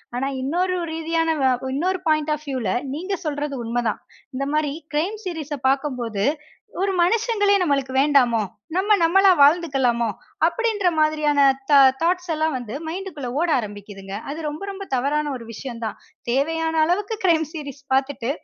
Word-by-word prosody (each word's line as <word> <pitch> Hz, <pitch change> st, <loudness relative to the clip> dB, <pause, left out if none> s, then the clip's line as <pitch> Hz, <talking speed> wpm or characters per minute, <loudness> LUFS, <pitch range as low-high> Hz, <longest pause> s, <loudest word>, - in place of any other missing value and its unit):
ஆனா, 265 Hz, +2 st, -1 dB
இன்னொரு 360 Hz, +7 st, 0 dB
ரீதியான 325 Hz, 0 st, 0 dB, 0.4 s
இன்னொரு 365 Hz, +6 st, 0 dB
பாயிண்ட் 310 Hz, -1 st, +2 dB
ஆஃப் 300 Hz, 0 st, -6 dB
வியூல 255 Hz, -8 st, -2 dB, 0.2 s
நீங்க 370 Hz, +7 st, -4 dB
சொல்வது 290 Hz, -1 st, -2 dB
உண்மைதான். 230 Hz, -1 st, -1 dB, 0.3 s
இந்த 275 Hz, +2 st, -2 dB
மாரி 305 Hz, -2 st, +1 dB, 0.2 s
கிரைம் 340 Hz, +8 st, 0 dB
சீரிஸ்ஸ 310 Hz, -5 st, -4 dB
பாக்கும்போது 250 Hz, -7 st, -1 dB, 0.6 s
ஒரு 390 Hz, 0 st, +1 dB
மனிதர்களே 410 Hz, +1 st, +3 dB
நமக்கு 275 Hz, -4 st, 0 dB
வேண்டாமோ, 255 Hz, -6 st, +3 dB, 0.3 s
நம்ப 410 Hz, +3 st, +2 dB
நம்பளா 385 Hz, +3 st, +6 dB
வாழ்ந்துக்கொள்ளலாமோ 270 Hz, -7 st, +3 dB, 0.4 s
அப்படின்ற 430 Hz, +1 st, 0 dB
மாதிரியான 305 Hz, -2 st, +2 dB, 0.3 s
தா 280 Hz, -, +8 dB, 0.2 s
தாட்ஸ் 355 Hz, +1 st, 0 dB
எல்லாம் 315 Hz, -1 st, 0 dB
வந்து 245 Hz, +1 st, -6 dB
மைண்ட்க்குள 340 Hz, -7 st, -6 dB
ஓட 345 Hz, -, +1 dB
ஆரமிக்குதுங்க. 205 Hz, -3 st, -7 dB
அது 300 Hz, +3 st, -5 dB
ரொம்ப, 300 Hz, +5 st, -6 dB
ரொம்ப 395 Hz, 0 st, -7 dB
தவறான 290 Hz, +3 st, 0 dB
ஒரு 230 Hz, -, -10 dB
விஷயம் 235 Hz, 0 st, -7 dB
தான். 220 Hz, -, -4 dB, 0.3 s
தேவையான 320 Hz, +5 st, +1 dB
அளவிற்கு 400 Hz, +6 st, 0 dB
கிரைம் 325 Hz, -3 st, +3 dB
சீரிஸ் 285 Hz, -3 st, -8 dB
பாத்துட்டு 265 Hz, -2 st, 0 dB
300 Hz, 140 wpm, -22 LUFS, 265-345 Hz, 0.6 s, தா